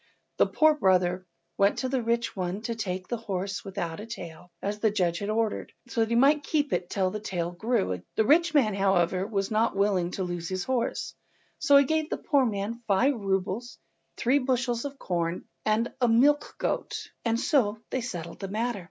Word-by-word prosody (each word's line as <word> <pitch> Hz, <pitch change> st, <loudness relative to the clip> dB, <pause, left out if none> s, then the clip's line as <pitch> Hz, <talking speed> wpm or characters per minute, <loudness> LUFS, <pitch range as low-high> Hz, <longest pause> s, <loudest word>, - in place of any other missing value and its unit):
The -, -, +4 dB
poor 310 Hz, -1 st, +4 dB
brother 185 Hz, -6 st, +2 dB, 0.3 s
went 200 Hz, +1 st, +4 dB
to 260 Hz, -, -1 dB
the 260 Hz, -1 st, 0 dB
rich 235 Hz, 0 st, -1 dB
one 185 Hz, +2 st, -3 dB
to 235 Hz, -, -2 dB
take 185 Hz, -5 st, -4 dB
the 240 Hz, -, -2 dB
horse 200 Hz, 0 st, -4 dB
without 185 Hz, -5 st, -4 dB
a 215 Hz, -, -7 dB
tail, 180 Hz, -5 st, -9 dB
as 205 Hz, +1 st, -3 dB
the 220 Hz, -, +3 dB
judge 180 Hz, -5 st, 0 dB
had 205 Hz, -, -3 dB
ordered, 220 Hz, 0 st, -1 dB, 0.2 s
so 230 Hz, -, 0 dB
that 225 Hz, -, +1 dB
he 235 Hz, -, +1 dB
might 285 Hz, +5 st, +5 dB
keep 295 Hz, -1 st, 0 dB
it 175 Hz, 0 st, -1 dB
till 190 Hz, -2 st, 0 dB
the 210 Hz, -, -4 dB
tail 175 Hz, -5 st, -3 dB
grew. 190 Hz, -, -1 dB
The 220 Hz, -, +2 dB
rich 335 Hz, +6 st, +4 dB
man, 225 Hz, -8 st, +4 dB
however, 190 Hz, -1 st, +2 dB
was 200 Hz, -1 st, -2 dB
not 220 Hz, 0 st, +2 dB
willing 195 Hz, -3 st, +2 dB
to 190 Hz, -, -2 dB
lose 175 Hz, -2 st, -4 dB
his 185 Hz, -1 st, -2 dB
horse, 255 Hz, 0 st, -1 dB, 0.5 s
so 280 Hz, -, +6 dB
he 280 Hz, -, +7 dB
gave 315 Hz, +2 st, 0 dB
the -, -, -2 dB
poor 280 Hz, -6 st, +2 dB
man 215 Hz, +2 st, -3 dB
five 230 Hz, +8 st, +3 dB
roubles, 195 Hz, +1 st, -2 dB, 0.4 s
three 265 Hz, +4 st, +3 dB
bushels 250 Hz, -2 st, 0 dB
of 280 Hz, 0 st, -6 dB
corn, 170 Hz, -4 st, -2 dB, 0.2 s
and 220 Hz, +2 st, +1 dB
a 245 Hz, -, +4 dB
milch 280 Hz, +6 st, +3 dB
goat, -, -, -3 dB
and 230 Hz, -1 st, +1 dB
so 235 Hz, -7 st, +2 dB
they 260 Hz, -, -1 dB
settled 170 Hz, -8 st, -6 dB
the 195 Hz, -, -4 dB
matter. 225 Hz, +2 st, -2 dB
215 Hz, 200 wpm, -27 LUFS, 185-245 Hz, 0.5 s, he